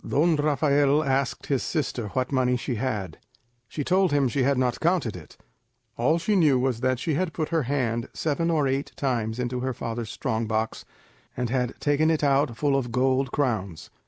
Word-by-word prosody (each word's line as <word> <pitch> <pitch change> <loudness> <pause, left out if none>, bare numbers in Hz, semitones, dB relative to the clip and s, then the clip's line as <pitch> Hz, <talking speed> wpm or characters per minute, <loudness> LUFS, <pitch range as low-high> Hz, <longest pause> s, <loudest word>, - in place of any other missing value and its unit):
Don 160 +3 +3
Rafael 145 0 +2
asked 135 -2 -1
his 135 -3 0
sister 130 -8 -2
what 130 +5 -2
money 125 -2 +2
she 125 - -3
had. 105 -8 -3 0.5
She 145 - -4
told 185 +2 +2
him 145 -2 +3
she 130 +3 -1
had 135 +1 +2
not 125 -1 0
counted 165 - +1
it; 85 -4 -12 0.6
all 145 +8 +2
she 205 +5 0
knew 155 -8 +4
was 125 -2 0
that 130 0 +1
she 155 +5 -2
had 165 +2 -1
put 155 -2 -2
her 165 -1 +1
hand 120 -4 -1
seven 165 +2 -1
or 155 -4 +2
eight 135 +2 -2
times 115 -5 -1
into 125 0 -2
her 130 0 -2
father's 115 -1 -4
strong 115 -2 -2
box, 110 0 -2 0.5
and 125 -1 -2
had 125 -1 -1
taken 150 +2 +2
it 160 -2 +1
out 135 -4 +2
full 140 +1 +1
of 125 -3 -1
gold 130 +2 +1
crowns. 105 - -2
130 Hz, 190 wpm, -25 LUFS, 120-145 Hz, 0.6 s, knew